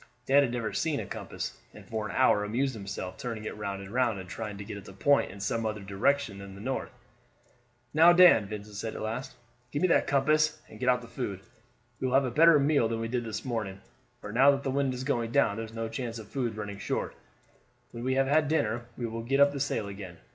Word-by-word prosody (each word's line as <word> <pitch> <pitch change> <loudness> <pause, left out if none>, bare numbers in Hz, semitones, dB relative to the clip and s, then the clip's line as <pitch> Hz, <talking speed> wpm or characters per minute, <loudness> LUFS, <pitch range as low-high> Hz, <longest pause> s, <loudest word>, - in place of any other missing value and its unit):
Dan 140 +2 +5
had 130 -4 0
never 120 -3 -3
seen 155 -3 0
a - - -4
compass, - - -6 0.2
and - - -12
for 110 -1 -3
an - - -6
hour 105 - +4
amused 130 +6 0
himself 100 -3 -6
turning 115 -3 -5
it - - -4
round 100 -2 -4
and 95 - -10
round 120 -4 +2
and 95 -1 -8
trying 105 +2 -6
to 100 - -6
get 105 +1 -7
it 100 - -11
to 95 - -11
point 140 +9 +3
in 100 - -10
some 115 +3 -1
other 110 -2 -3
direction 100 +3 0
than 100 -1 -9
the - - -11
north. 130 +6 -3 1.0
"Now, 165 +3 +8
Dan," 175 - +7
Vincent 105 0 -7
said 110 +2 -4
at - - -6
last, 125 +5 -4 0.3
"give 145 +5 -2
me - - +5
that - - +3
compass, 150 +3 +2
and 110 - -13
get 125 - +1
out 125 0 +3
the - - -10
food. 100 -6 -5 0.6
We 130 - -1
will 130 - +1
have 135 0 +4
a 125 - -2
better 165 +4 +7
meal 140 -4 +3
than 115 0 -2
we 115 0 -3
did 125 0 -1
this 110 +2 -5
morning, 110 -6 -3 0.4
for 105 - -7
now 130 +5 +6
that 140 -1 +2
the 135 - -1
wind 135 -1 0
is 125 - -5
going 120 -4 0
down 100 - +3
there's 110 0 -6
no 115 0 -3
chance 115 0 -4
of 110 -2 -9
food 120 -5 -2
running 105 -2 -5
short. - - -2 0.8
When 115 - -7
we 130 +1 +1
have 135 0 +3
had 150 +2 +3
dinner 120 -6 0
we 120 - -3
will 115 0 -4
get 135 +4 0
up 140 0 +6
the 140 - -5
sail 130 -6 -1
again. 95 -3 -8
115 Hz, 250 wpm, -29 LUFS, 105-135 Hz, 1.0 s, Now